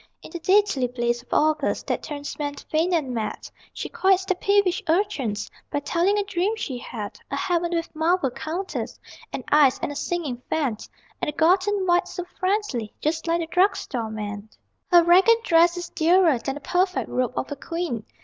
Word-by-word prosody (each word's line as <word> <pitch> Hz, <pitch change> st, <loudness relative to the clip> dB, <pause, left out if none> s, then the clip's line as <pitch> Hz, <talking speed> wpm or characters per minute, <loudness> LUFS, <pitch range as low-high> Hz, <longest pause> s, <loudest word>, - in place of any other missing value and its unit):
In -, -, -11 dB
the 345 Hz, -, -5 dB
deadly 375 Hz, -8 st, +3 dB
blaze 240 Hz, -1 st, -1 dB
of 245 Hz, -, -27 dB
August, 310 Hz, 0 st, +1 dB
That -, -, -1 dB
turns 290 Hz, -1 st, -6 dB
men 290 Hz, -1 st, -2 dB
faint 320 Hz, +5 st, -1 dB
and 300 Hz, -7 st, 0 dB
mad, 225 Hz, -2 st, -4 dB, 0.2 s
She -, -, -5 dB
quiets 385 Hz, 0 st, +2 dB
the 375 Hz, -, +2 dB
peevish 400 Hz, +1 st, +2 dB
urchins 310 Hz, -, 0 dB, 0.2 s
By 290 Hz, -, -1 dB
telling 355 Hz, +7 st, +1 dB
a 410 Hz, -, +1 dB
dream 395 Hz, +2 st, -1 dB
she 265 Hz, -, -4 dB
had 215 Hz, -3 st, -7 dB
A -, -, -2 dB
heaven 350 Hz, -2 st, 0 dB
with 330 Hz, -1 st, -3 dB
marble 320 Hz, -3 st, +1 dB
counters, 345 Hz, +9 st, -5 dB, 0.3 s
And -, -, -5 dB
ice, 290 Hz, -3 st, +5 dB
and -, -, -3 dB
a -, -, -7 dB
singing 290 Hz, -6 st, -3 dB
fan; 275 Hz, -9 st, 0 dB, 0.4 s
And -, -, 0 dB
a -, -, -1 dB
God 360 Hz, +6 st, +3 dB
in 410 Hz, -2 st, 0 dB
white, 355 Hz, 0 st, +3 dB
so 360 Hz, -, -5 dB
friendly, 370 Hz, -, -2 dB
Just 320 Hz, +2 st, -2 dB
like 335 Hz, +1 st, +1 dB
the -, -, -2 dB
drug 360 Hz, +5 st, +3 dB
store 230 Hz, -4 st, -4 dB
man. 210 Hz, -1 st, -6 dB, 0.4 s
Her 345 Hz, -1 st, +8 dB
ragged 385 Hz, +7 st, +5 dB
dress 340 Hz, 0 st, +4 dB
is 350 Hz, -1 st, -5 dB
dearer 330 Hz, -4 st, +3 dB
Than 270 Hz, +3 st, -3 dB
the 295 Hz, -, -8 dB
perfect 365 Hz, +3 st, 0 dB
robe 250 Hz, -1 st, -1 dB
of 265 Hz, -, -3 dB
a -, -, -2 dB
queen! 305 Hz, -6 st, -4 dB
330 Hz, 195 wpm, -24 LUFS, 270-370 Hz, 0.4 s, Her